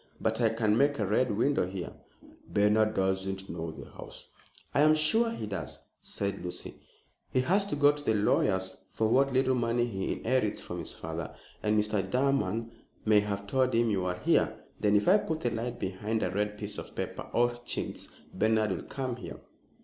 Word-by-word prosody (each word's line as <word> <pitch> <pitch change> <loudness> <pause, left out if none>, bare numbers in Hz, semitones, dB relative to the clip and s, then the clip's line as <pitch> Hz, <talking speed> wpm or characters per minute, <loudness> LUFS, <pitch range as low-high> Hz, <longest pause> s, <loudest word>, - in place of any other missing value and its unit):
But 110 +2 0
I 115 - +5
can 110 -1 +1
make 145 +1 +3
a 105 - 0
Red 110 +6 +2
Window 135 -5 +2
here." 95 -1 -5 0.6
"Bernard 110 +1 +3
doesn't 95 0 -1
know 80 0 -4
the 80 - -9
house." - - -10 0.4
"I 140 - +3
am 155 +1 +6
sure 220 +10 +3
he 225 - -4
does," 95 -8 -4
said 100 -1 -3
Lucy. 90 - -6 0.5
"He 130 - +2
has 195 +9 +2
to 200 - -3
go 145 0 +6
to 145 0 -7
the 110 - +2
lawyers 95 -2 +1
for 110 - +1
what 135 +4 +3
little 130 0 +3
money 120 -1 +1
he 95 -5 -2
inherits 115 -3 0
from - - -6
his - - -2
father, 80 0 -5 0.3
and 105 0 +2
Mr. 105 -1 +1
Durham 115 -3 +1 0.3
may 110 -1 +6
have 100 -1 -3
told 130 +3 +1
him 115 -1 +3
you 95 -3 0
are 90 0 -1
here. - - +2 0.2
Then 105 0 +3
if 105 - +3
I 190 +4 +7
put 160 -5 -3
the 120 - 0
light 115 +2 -3
behind 105 +4 -2
a 90 - 0
red 105 +2 -1
piece 105 0 -4
of - - -10
paper - - -5
or 120 0 +3
chintz, - - -3 0.3
Bernard 110 +1 +2
will 95 - -2
come 130 -3 -4
here." - - -8
110 Hz, 195 wpm, -30 LUFS, 100-130 Hz, 0.6 s, I